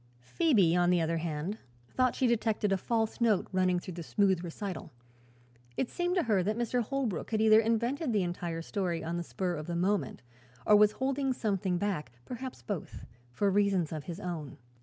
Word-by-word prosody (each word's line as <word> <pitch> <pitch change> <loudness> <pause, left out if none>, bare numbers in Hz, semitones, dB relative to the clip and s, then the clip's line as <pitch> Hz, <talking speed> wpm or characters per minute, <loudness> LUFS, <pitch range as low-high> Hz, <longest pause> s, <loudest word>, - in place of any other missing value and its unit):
Phoebe, 190 - +3
on 175 0 +3
the 180 -1 +4
other 165 0 0
hand, 165 +5 -3 0.3
thought 255 -1 +2
she 260 - +1
detected 220 -3 +1
a 195 - +3
false 225 +3 -1
note 220 -5 +3
running 185 -1 +2
through 180 - -8
the 170 - -6
smooth 190 +1 +1
recital. 180 +2 -6 0.9
It 255 - -1
seemed 355 0 -1
to 360 - +2
her 210 -5 +2
that 210 +4 -1
Mr. 240 +1 0
Holbrook 240 - -2
had 220 - 0
either 220 0 +6
invented 235 +6 0
the 205 -4 +2
entire 175 -1 -3
story 175 -4 -2
on 170 +2 -3
the 175 - -2
spur 180 +1 -2
of 155 -2 -5
the 170 - -3
moment 190 -1 0 0.4
or 210 - +6
was 210 0 +6
holding 270 0 0
something 195 -6 -1
back 175 - -2
perhaps 255 +1 -7
both 200 -7 -5 0.2
for 195 +11 +1
reasons 195 -5 +2
of 155 -2 -5
his 175 0 -6
own. 160 -7 -5
200 Hz, 190 wpm, -30 LUFS, 175-225 Hz, 0.9 s, either